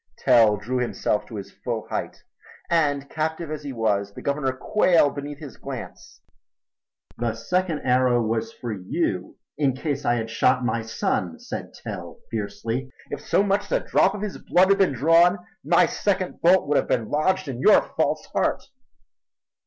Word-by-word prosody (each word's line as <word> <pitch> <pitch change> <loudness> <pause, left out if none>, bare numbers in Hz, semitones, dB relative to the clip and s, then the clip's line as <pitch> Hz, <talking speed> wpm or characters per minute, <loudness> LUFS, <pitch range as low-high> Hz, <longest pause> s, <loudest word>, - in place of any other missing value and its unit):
Tell 110 -4 +5
drew 125 +5 -2
himself 120 -3 -1
to 115 - -9
his 100 -2 -7
full 115 -3 -5
height - - -4 0.5
and, 145 -4 +2
captive 160 +1 -3
as 155 -1 -4
he 145 -2 -6
was, 100 -4 -1
the - - -8
Governor 140 -1 0
quailed 165 +2 +3
beneath 145 0 -6
his 145 -5 -10
glance. - - -9 1.0
"The 115 -2 -1
second 170 +7 -1
arrow 125 -1 +3
was 115 - -1
for 120 - -6
you 95 -3 -3 0.2
in 135 -4 +2
case 145 0 -3
I 120 - +2
had 115 -1 -3
struck 125 +2 +2
my 115 -1 0
son!" 95 -6 -2
said - - -7
Tell - - -7
fiercely. 115 +4 -3 0.2
"If - - -4
so 200 - +2
much 200 0 +1
as - - -5
a - - -18
drop 195 - +3
of 210 - -5
his 210 - -5
blood 185 +2 +3
had 195 - +4
been 185 -7 +3
drawn, 165 +7 +4 0.3
my 170 +5 +4
second 190 -3 -2
bolt 180 0 +4
would 145 0 +2
have - - +1
been 115 -4 0
lodged 185 +4 +1
in 130 -3 -5
your - - +6
false - - 0
heart." - - 0
140 Hz, 175 wpm, -24 LUFS, 115-170 Hz, 1.0 s, your